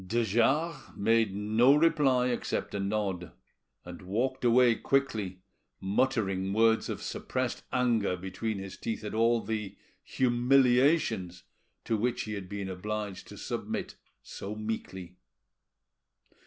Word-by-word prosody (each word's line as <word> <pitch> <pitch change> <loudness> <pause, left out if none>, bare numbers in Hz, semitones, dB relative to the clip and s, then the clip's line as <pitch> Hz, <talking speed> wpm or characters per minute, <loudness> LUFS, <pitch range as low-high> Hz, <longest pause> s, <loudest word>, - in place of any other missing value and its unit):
De 120 +4 +1
Jars 135 - +2 0.2
made 110 -1 +2
no 110 +6 +4
reply 145 -6 +3
except 120 - -2
a 100 - -2
nod, 100 -3 -2 0.5
and 90 +2 -9
walked 120 +9 -2
away 120 0 +5
quickly, 110 -9 -1 0.4
muttering 95 -2 0
words 110 +1 +3
of - - -4
suppressed - - -3
anger 115 -7 +1
between 95 +4 -4
his 95 -1 -7
teeth 110 -1 -4
at 105 - -5
all 115 +1 +3
the—humiliations 120 - +1 0.4
to 115 - 0
which 120 +3 -1
he 105 - -5
had 100 -3 -6
been 100 -1 -4
obliged 105 +1 -5
to - - -11
submit - - -4 0.3
so 100 +2 -7
meekly. 95 -4 -5
110 Hz, 120 wpm, -29 LUFS, 95-125 Hz, 0.5 s, away